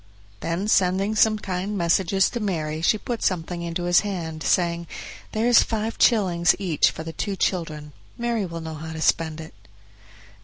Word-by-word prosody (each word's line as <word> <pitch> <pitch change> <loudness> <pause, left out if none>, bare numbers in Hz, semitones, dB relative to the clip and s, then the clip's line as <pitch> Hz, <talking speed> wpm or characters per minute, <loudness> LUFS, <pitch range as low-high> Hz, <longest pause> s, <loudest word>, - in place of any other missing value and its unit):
Then 170 - -2
sending 195 +1 +2
some 215 0 +4
kind 195 +1 -3
messages 185 +2 +2
to 240 - -3
Mary 160 -7 -2
she 195 +6 +3
put 235 +2 -5
something 175 -1 -1
into 170 +1 -3
his 175 0 +4
hand, 170 -6 -4
saying, 170 +3 +1 0.4
"There 220 +1 -1
is 240 -1 +6
five 225 0 -2
shillings 180 -7 +4
each 175 -7 +2
for 160 - -7
the 165 0 -7
two 200 +3 -3
children; 155 -5 -2 0.3
Mary 235 -4 -1
will 165 -1 -6
know 160 0 -6
how 160 +1 -7
to 160 - -6
spend 160 -1 +1
it." 160 0 -9
175 Hz, 175 wpm, -24 LUFS, 165-205 Hz, 0.4 s, is